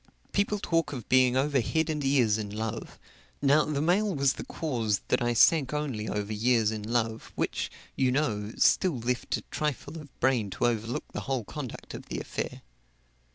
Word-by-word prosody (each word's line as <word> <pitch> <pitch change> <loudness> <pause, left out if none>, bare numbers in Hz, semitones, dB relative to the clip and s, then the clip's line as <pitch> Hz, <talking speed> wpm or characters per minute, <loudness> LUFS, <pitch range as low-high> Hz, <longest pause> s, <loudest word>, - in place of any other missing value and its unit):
People 200 +1 +1
talk 165 -6 0
of 120 -5 -6
being 130 0 +5
over 140 +1 +2
head 160 +7 0
and 150 -2 -2
ears 125 -6 +3
in 105 -1 -4
love 110 +1 -5 0.4
now, 145 +2 +4
the 150 -1 -1
mail 190 +3 +2
was 140 -2 +3
the - - -7
cause 115 -10 -1
that - - +2
I 120 0 +1
sank 150 +2 +5
only 130 -8 -2
over 105 +1 -2
ears 110 0 +2
in 110 -1 -4
love, 115 0 -1
which, - - -1 0.3
you 130 -2 +2
know, 110 -7 0
still 180 -8 +3
left 125 +1 -1
a - - -7
trifle 150 +2 -3
of 145 -3 -14
brain 120 -5 +2
to - - +1
overlook 115 0 -1
the - - -4
whole 130 -4 0
conduct 130 +2 -7
of - - -8
the - - -4
affair. - - -5
130 Hz, 185 wpm, -28 LUFS, 110-150 Hz, 0.4 s, being